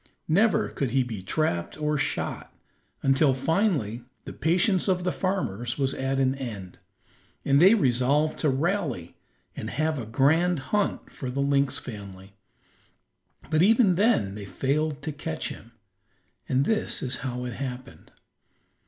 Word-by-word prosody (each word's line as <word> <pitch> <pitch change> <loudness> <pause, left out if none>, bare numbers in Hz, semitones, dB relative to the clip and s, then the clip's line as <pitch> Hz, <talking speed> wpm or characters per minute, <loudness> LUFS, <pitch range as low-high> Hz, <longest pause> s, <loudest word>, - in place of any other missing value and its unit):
Never 200 +8 +3
could 135 - -2
he 130 +2 +2
be 110 -6 -6
trapped 95 - -1
or 150 0 0
shot, 140 - -2 0.5
until 135 0 +3
finally 135 - 0 0.2
the - - -7
patience 180 +4 +1
of 180 -2 +1
the 180 - 0
farmers 120 - -2
was 135 -2 +1
at 135 0 -1
an 130 -1 +2
end, 110 -9 -7 0.7
and 140 +2 +4
they 195 +5 +8
resolved 140 - +2
to 155 - +2
rally 140 - -1 0.4
and - - -5
have 155 -1 -1
a 115 - -6
grand 160 +9 +3 0.2
hunt 205 -1 0
for 130 - -6
the 130 +2 -3
lynx 140 -1 +2
family; 100 -3 -9 1.2
but 155 0 +3
even 215 0 +5
then 180 - +2
they 105 -1 -7
failed 145 +6 -1
to 155 - -3
catch 140 - -4
him, - - -11 0.8
and 135 +2 +2
this 220 +3 0
is 125 -1 +1
how 125 -1 -4
it 125 - -4
happened. 125 0 -7
140 Hz, 145 wpm, -26 LUFS, 125-165 Hz, 1.2 s, they